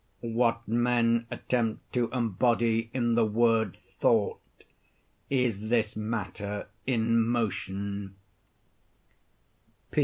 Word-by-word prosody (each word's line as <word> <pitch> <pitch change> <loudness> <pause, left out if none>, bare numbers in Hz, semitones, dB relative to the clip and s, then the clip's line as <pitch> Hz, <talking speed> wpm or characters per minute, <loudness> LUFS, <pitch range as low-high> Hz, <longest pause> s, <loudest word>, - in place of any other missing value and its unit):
What 115 0 +1
men 115 0 +2
attempt 115 -3 -2
to 120 -2 +1
embody 115 -1 +1
in 120 -2 +1
the 115 0 +4
word 110 -2 +2 0.2
"thought," - - +2 0.9
is 115 -6 0
this 110 -3 +1
matter 105 -2 -4 0.2
in 115 -2 +2
motion. 100 -3 -2
115 Hz, 85 wpm, -28 LUFS, 110-120 Hz, 0.9 s, the